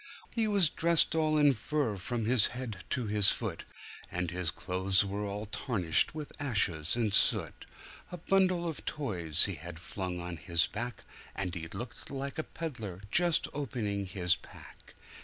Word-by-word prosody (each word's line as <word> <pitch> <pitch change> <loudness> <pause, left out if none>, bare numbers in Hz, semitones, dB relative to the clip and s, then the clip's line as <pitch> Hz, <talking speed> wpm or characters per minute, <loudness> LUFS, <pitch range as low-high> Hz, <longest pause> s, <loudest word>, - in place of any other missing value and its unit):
He 225 -2 +1
was 200 -7 +3
dressed 170 -1 +5
all 155 -1 +2
in 145 -2 +5
fur, 130 -1 -1
from 115 +4 -3
his 120 -1 +4
head 110 -8 -6
to 125 - -1
his 105 -2 +4
foot, - - -2 0.5
And 90 -1 -2
his 90 -2 -1
clothes 95 +3 +1
were 100 +1 -3
all 100 +2 -4
tarnished 105 - +1
with 150 -2 -6
ashes 100 - +1
and 110 -4 0
soot; - - +4 0.4
A 180 - -5
bundle 185 0 +2
of 160 - -5
toys 85 - +1
he 100 - -2
had 85 0 -9
flung 90 +1 -5
on 85 -1 -6
his 85 -1 +1
back, 115 0 -6 0.3
And 95 -2 -3
he 80 -1 -5
looked 120 +8 -7
like 140 +2 -5
a - - 0
peddler 115 - -7
just 175 -2 +3
opening 105 -8 -3
his 90 -2 +1
pack. - - -15
105 Hz, 165 wpm, -31 LUFS, 90-145 Hz, 0.5 s, dressed